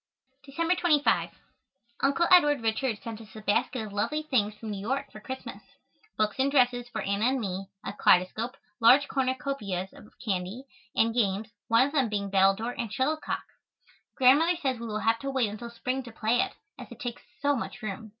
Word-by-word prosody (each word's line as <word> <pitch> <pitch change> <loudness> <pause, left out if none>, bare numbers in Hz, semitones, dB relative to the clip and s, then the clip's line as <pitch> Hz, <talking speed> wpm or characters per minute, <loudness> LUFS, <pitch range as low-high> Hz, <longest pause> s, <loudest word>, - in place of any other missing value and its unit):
December 330 +5 0
25. 305 -5 +2 0.7
Uncle 280 +5 +2
Edward 295 -7 +6
Richards 225 0 0
sent 225 -1 -6
us 220 0 -15
a 215 - -8
basket 220 +3 0
of 205 - -9
lovely 300 +9 -1
things 215 -8 +1
from 215 0 -7
New 200 -1 -5
York 270 +6 -2
for 215 - -10
Christmas. 260 +4 -7 0.6
Books 215 -1 0
and 270 +1 +3
dresses 245 -3 +2
for - - -4
Anna 200 +2 0
and 260 +2 +2
me, 195 -3 -4 0.2
a - - -4
kaleidoscope, 210 +6 +2 0.2
large 255 +5 +6
cornucopias 260 -9 -2
of 210 - -15
candy, 195 +3 -3 0.3
and 225 0 +3
games, 215 -2 0 0.2
one 230 +3 +5
of 285 - -5
them 270 -6 +2
being 200 -2 -2
battledore 195 +5 +3
and 230 -4 -3
shuttlecock. 305 +7 -1 0.7
Grandmother 295 +7 +5
says 265 -6 -1
we 235 - -5
will 215 -1 -2
have 225 +2 +2
to 275 - -4
wait 260 -5 +1
until 235 +3 -7
spring 255 +3 -3
to 245 -2 -10
play 225 +2 +1
it, - - 0 0.3
as - - -10
it - - -11
takes 240 -1 -5 0.2
so 285 0 +2
much 245 -1 -5
room. 215 +1 -5
235 Hz, 190 wpm, -28 LUFS, 210-270 Hz, 0.7 s, Edward